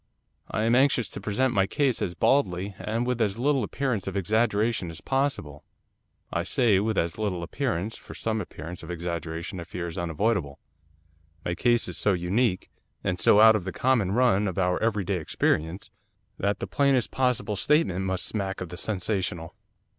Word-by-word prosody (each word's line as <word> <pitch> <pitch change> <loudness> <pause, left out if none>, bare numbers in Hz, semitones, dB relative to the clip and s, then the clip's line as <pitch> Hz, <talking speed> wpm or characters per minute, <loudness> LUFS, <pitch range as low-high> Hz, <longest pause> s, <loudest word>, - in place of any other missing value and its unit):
I 110 - -1
am 115 +1 +3
anxious 125 -5 +3
to - - -6
present 120 +5 0
my 95 -3 +3
case 135 +1 +1
as 90 - -2
baldly, 100 -8 +1
and 115 +3 -2
with 125 -1 -1
as 105 -1 +1
little 135 +1 +2
appearance 115 -3 -2
of 95 0 -2
exaggeration 110 0 +1
as 80 - -9
possible. 135 - -2 0.7
I 85 - +1
say 105 +2 +3
with 110 +1 -1
as 85 +4 -1
little 95 -5 -1
appearance, 110 0 -2
for - - -12
some 110 -1 -1
appearance 85 -1 -8
of 80 - -10
exaggeration 85 0 -4
I - - -5
fear 90 +1 -5
is 85 +2 -5
unavoidable. 85 -3 -1 0.9
My 85 - 0
case 120 +6 +2
is - - -4
so 105 - +3
unique, 90 +3 0 0.3
and 90 -2 -1
so 105 - +6
out 110 0 +8
of 105 - -1
the 95 - -4
common 115 -7 +1
run 105 -4 +3
of 95 - -4
our 90 -1 +1
every 105 -3 +1
day 95 0 -1
experience, 80 +2 -1 0.5
that 100 0 0
the - - -4
plainest 140 -4 +2
possible 125 -5 0
statement 100 - +2
must 95 -1 -2
smack 95 -3 -3
of 90 - -5
the 90 - -8
sensational. 90 -4 -2
100 Hz, 180 wpm, -26 LUFS, 90-115 Hz, 0.9 s, out